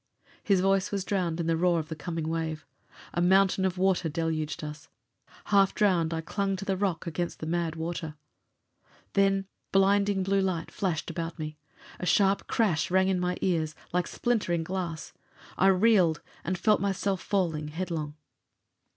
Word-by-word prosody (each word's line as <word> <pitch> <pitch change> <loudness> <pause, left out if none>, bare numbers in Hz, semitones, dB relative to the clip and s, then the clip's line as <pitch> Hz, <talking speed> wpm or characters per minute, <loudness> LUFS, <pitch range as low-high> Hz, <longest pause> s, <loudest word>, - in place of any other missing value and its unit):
His 195 -3 +3
voice 195 0 +2
was 200 -2 -2
drowned 180 -5 -1
in 170 - -1
the 165 0 +2
roar 175 +1 +2
of 155 -1 -3
the 160 - -4
coming 160 +1 -4
wave. 160 -1 -3 0.5
A 175 - 0
mountain 190 +1 +4
of 185 -1 -1
water 185 -2 +2
deluged 155 -1 -2
us. 150 0 -7 0.7
Half 195 -1 +5
drowned, 175 -6 +2
I 165 -1 -2
clung 195 +3 -1
to 195 +1 -6
the 195 -1 0
rock 185 -4 -1
against 170 +1 -3
the - - -5
mad 165 0 -1
water. 160 -1 -4 1.0
Then 195 0 +3 0.3
blinding 195 0 +3
blue 195 +1 +2
light 180 -4 -2
flashed 170 -7 -2
about 165 -1 -4
me. 155 -1 -6 0.4
A 180 - -3
sharp 195 +2 +3
crash 185 -9 +1
rang 190 +1 +3
in 185 -1 +1
my 180 0 -1
ears, 160 -4 0 0.2
like 180 0 +1
splintering 205 -9 0
glass. 175 -2 -4 0.4
I 190 - +3
reeled, 190 -4 +4 0.2
and 185 +3 -1
felt 210 +4 +3
myself 195 -1 -1
falling 165 -7 -1
headlong. 155 -2 -4
180 Hz, 165 wpm, -28 LUFS, 160-195 Hz, 1.0 s, Half